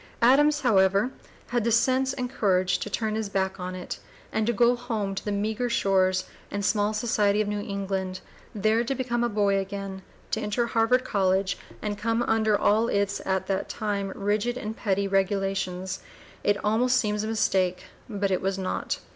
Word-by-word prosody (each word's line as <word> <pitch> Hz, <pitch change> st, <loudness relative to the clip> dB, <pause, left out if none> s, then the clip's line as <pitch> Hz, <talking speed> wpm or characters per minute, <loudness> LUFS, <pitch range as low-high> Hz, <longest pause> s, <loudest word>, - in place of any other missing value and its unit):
Adams, 295 Hz, +4 st, +5 dB
however, 200 Hz, 0 st, +3 dB, 0.4 s
had 240 Hz, -2 st, 0 dB
the 235 Hz, -, +1 dB
sense 260 Hz, +3 st, +3 dB
and 250 Hz, -2 st, -3 dB
courage 185 Hz, -7 st, +2 dB
to -, -, -4 dB
turn 215 Hz, +1 st, -1 dB
his 220 Hz, -1 st, -2 dB
back 190 Hz, -1 st, -1 dB
on 180 Hz, 0 st, -4 dB
it, 180 Hz, -, -6 dB, 0.3 s
and 220 Hz, 0 st, 0 dB
to -, -, +4 dB
go 240 Hz, +2 st, +4 dB
home 225 Hz, -5 st, -3 dB
to 195 Hz, -, -5 dB
the 210 Hz, -, -2 dB
meagre 215 Hz, +4 st, -1 dB
shores 185 Hz, -4 st, +2 dB, 0.2 s
and 200 Hz, 0 st, -3 dB
small 205 Hz, -1 st, +2 dB
society 210 Hz, -2 st, +1 dB
of 215 Hz, -, +1 dB
New 210 Hz, 0 st, -2 dB
England, 195 Hz, -2 st, -3 dB, 0.4 s
there 215 Hz, +3 st, +2 dB
to 270 Hz, +3 st, -2 dB
become 240 Hz, -2 st, -1 dB
a 240 Hz, -, +1 dB
boy 200 Hz, -2 st, +2 dB
again, 195 Hz, 0 st, -5 dB, 0.3 s
to 220 Hz, -, 0 dB
enter 220 Hz, +3 st, 0 dB
Harvard 235 Hz, +2 st, +2 dB
College, 190 Hz, -3 st, +1 dB, 0.3 s
and 205 Hz, -1 st, -3 dB
come 230 Hz, +3 st, +1 dB
under 220 Hz, -2 st, +2 dB
all 220 Hz, +3 st, +3 dB
its 200 Hz, -1 st, 0 dB
at 190 Hz, -1 st, 0 dB
that 195 Hz, -1 st, -2 dB
time 200 Hz, -2 st, -2 dB
rigid 210 Hz, +4 st, 0 dB
and 220 Hz, -3 st, -5 dB
petty 200 Hz, -2 st, 0 dB
regulations. 195 Hz, -1 st, -1 dB, 0.4 s
It 205 Hz, 0 st, +3 dB
almost 245 Hz, +4 st, +3 dB
seems 210 Hz, -3 st, 0 dB
a -, -, -2 dB
mistake, 190 Hz, -4 st, +1 dB, 0.3 s
but 200 Hz, -2 st, -1 dB
it 185 Hz, -, +1 dB
was 195 Hz, 0 st, -1 dB
not. 190 Hz, -1 st, -2 dB
205 Hz, 180 wpm, -26 LUFS, 195-230 Hz, 0.4 s, Adams